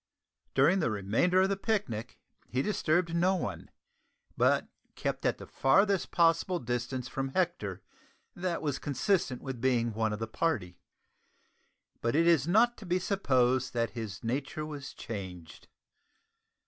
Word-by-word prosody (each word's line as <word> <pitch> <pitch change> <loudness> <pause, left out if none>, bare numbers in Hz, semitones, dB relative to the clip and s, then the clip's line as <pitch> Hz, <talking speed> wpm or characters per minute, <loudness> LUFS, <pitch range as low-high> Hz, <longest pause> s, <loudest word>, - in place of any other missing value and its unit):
During 185 +3 +5
the 155 - +1
remainder 110 - +2
of 190 - +2
the 200 - +1
picnic 190 - -2 0.3
he 130 +2 -1
disturbed 170 -4 +1
no 185 +3 +3
one, 100 - -4 0.7
but - - +3 0.3
kept - - -1
at - - 0
the - - -9
farthest 195 +8 +2
possible 170 +2 +3
distance 125 0 -3
from 135 +2 -3
Hector 105 - -1 0.5
that 175 -2 -2
was 145 -3 -1
consistent 145 -1 0
with 130 -4 -5
being 120 -3 +2
one 110 0 0
of 105 - -2
the 115 - -3
party. 110 - -2 1.2
But 115 +2 0
it 165 +2 +4
is 165 -4 +4
not 230 +6 +4
to 215 - -10
be 175 +1 +2
supposed 130 -10 +1
that 115 -1 0
his 110 -4 -6
nature 135 +6 -2
was 145 -3 -7
changed. 95 -7 -8
135 Hz, 145 wpm, -30 LUFS, 115-175 Hz, 1.2 s, During